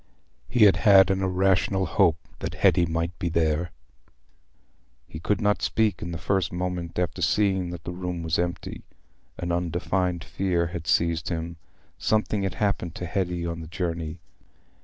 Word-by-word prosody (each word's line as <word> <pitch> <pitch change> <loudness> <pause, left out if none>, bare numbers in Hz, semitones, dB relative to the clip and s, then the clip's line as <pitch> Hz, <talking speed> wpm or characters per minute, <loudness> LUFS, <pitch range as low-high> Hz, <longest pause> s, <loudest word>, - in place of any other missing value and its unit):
He 120 -3 +4
had 100 -2 +7
had 100 -3 +6
an 95 0 0
irrational 95 +1 +2
hope 85 -2 +3 0.2
that - - -4
Hetty 85 -1 +4
might 85 0 -2
be 85 - -1
there. 80 +1 +1 1.4
He 80 - -8
could 105 +5 0
not 105 0 +1
speak 110 -2 +1
in 85 - -4
the 85 - -4
first 95 +1 0
moment 90 -1 -3
after 90 +1 -1
seeing 95 +1 +2
that 85 -1 -7
the - - -5
room 90 -1 -4
was 80 0 0
empty; 85 0 -3 0.6
an 85 0 -3
undefined 90 +1 -1
fear 90 -4 0
had 85 -3 -5
seized 85 0 +1
him—something 85 +5 -3
had 95 -1 -2
happened 100 -5 -1
to 90 - -5
Hetty 90 -1 -2
on 85 -1 -3
the 80 - -8
journey. 85 -1 -3
90 Hz, 160 wpm, -26 LUFS, 85-95 Hz, 1.4 s, had